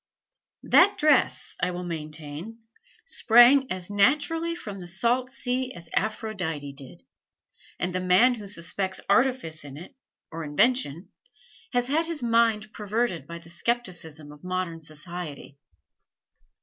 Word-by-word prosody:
That 400 +3 +5
dress, 300 -3 +2
I 180 - +2
will 180 0 -5
maintain, 155 +4 -7 0.5
sprang 255 - +5
as 185 +1 -4
naturally 305 +10 +2
from 205 - -7
the 175 - -8
salt 235 +8 +1
sea 260 -1 -2
as 170 -1 -11
Aphrodite 185 -10 -2
did; 135 -9 -12 0.7
and 180 +1 -2
the 185 - 0
man 185 +8 +5
who 210 -4 -8
suspects 190 0 -3
artifice 200 - +1
in 140 -1 -10
it, 175 +4 -11 0.4
or 165 0 -5
invention, 170 - +1 0.6
has 245 0 +2
had 315 +5 +1
his 330 -5 -3
mind 230 -2 +2
perverted 210 - -2
by 170 - -7
the 170 0 -14
skepticism 170 -7 -3
of 150 +2 -15
modern 180 -2 -3
society." 155 -2 -5
190 Hz, 130 wpm, -26 LUFS, 165-245 Hz, 0.7 s, That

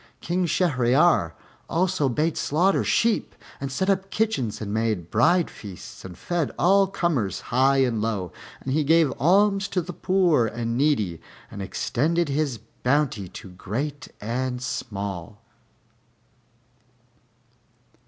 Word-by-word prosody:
King 175 +1 -1
Shahryar 130 - +3 0.4
also 175 -4 +1
bade 155 +6 0
slaughter 180 +7 +2
sheep, 230 -1 +1 0.2
and 135 0 -4
set 190 +9 -1
up 195 -1 +1
kitchens 135 - -1
and 105 -2 -4
made 110 -6 -1
bride 175 +2 +3
feasts 100 -4 -10
and 90 -2 -9
fed 175 - -1
all 195 +2 +4
comers, 165 - -1
high 135 +1 +4
and 115 -4 -1
low; 105 -5 -2 0.3
and 130 - -3
he 155 +1 +2
gave 160 -2 +4
alms 195 - +3
to 185 - -1
the 180 +1 -5
poor 175 - +2
and 115 +1 -3
needy 120 - +1 0.3
and 100 - -7
extended 155 - 0
his 140 -3 0 0.2
bounty 125 -8 +1
to 95 +1 -10
great 130 +11 -4
and 125 +3 -3
small. 100 -5 -5
135 Hz, 125 wpm, -24 LUFS, 110-175 Hz, 0.4 s, all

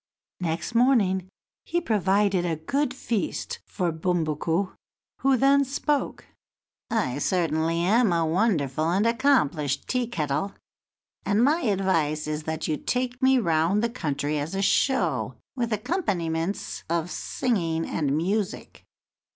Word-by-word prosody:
Next 165 +3 -3
morning 210 -7 +3 0.3
he 345 - 0
provided 200 - +2
a 170 -2 0
good 265 - -1
feast 235 -5 -3
for 180 -4 -1
Bumbuku, 165 +2 -1 0.5
who 270 -1 +3
then 275 +3 +4
spoke: 280 +2 -1 0.6
"I 145 - 0
certainly 165 0 +1
am 215 +4 +3
a 165 -1 +2
wonderful 160 - +1
and 195 +5 +2
accomplished 220 - +1
Tea 250 -2 0
kettle, 160 -2 -2 0.7
and 210 +3 +2
my 305 +6 +3
advice 185 - +1
is 155 0 -4
that 160 0 -3
you 155 - 0
take 250 - -2
me 265 0 +5
round 170 0 +2
the 235 - 0
country 150 - -2
as 155 +6 -4
a 195 - 0
show, 265 +6 +1 0.2
with 235 -3 -2
accompaniments 195 - -2
of 170 +1 -1
singing 165 -10 -1
and 145 -2 -1
music." 195 +4 -2
185 Hz, 125 wpm, -26 LUFS, 160-235 Hz, 0.7 s, me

